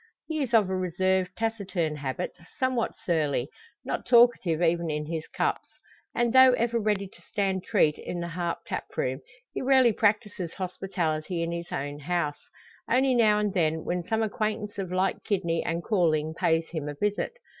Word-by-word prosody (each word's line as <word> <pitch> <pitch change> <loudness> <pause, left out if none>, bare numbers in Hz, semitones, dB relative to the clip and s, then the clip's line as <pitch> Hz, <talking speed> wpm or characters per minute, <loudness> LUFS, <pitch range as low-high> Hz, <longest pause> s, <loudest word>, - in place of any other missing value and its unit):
He 315 -2 -2
is 260 -4 -2
of 215 -4 +5
a 190 - -1
reserved, 185 0 +1
taciturn 195 -8 -1
habit, 140 +5 -4 0.2
somewhat 255 -3 0
surly: 150 -6 0 0.4
not - - -2
talkative 235 -9 +4
even 170 -1 +1
in 150 0 -2
his 160 0 -4
cups. - - -1 0.5
And 240 -1 +1
though 260 -1 +8
ever 235 -1 +1
ready 205 -2 0
to - - -20
stand 195 -3 -1
treat 160 -9 +2
in 175 - -5
the 170 0 -4
Harp 170 0 -2
tap - - -4
room 130 +2 -1 0.3
he - - -3
rarely 260 -3 +5
practises 205 -5 0
hospitality 180 -3 -2
in 165 - -2
his 170 0 -5
own 145 +1 -4
house; 150 -1 -2 0.4
only 260 +2 +3
now 220 -3 +4
and 210 -2 0
then, 160 -3 +1
when 180 0 -1
some 220 +4 0
acquaintance 210 -1 -2
of 185 -2 -4
like 185 +1 0
kidney 170 -5 0
and 170 +1 -2
calling 160 -6 +1
pays 165 0 +1
him 155 -4 -4
a 145 - -5
visit. 205 - -1
185 Hz, 175 wpm, -27 LUFS, 165-215 Hz, 0.5 s, though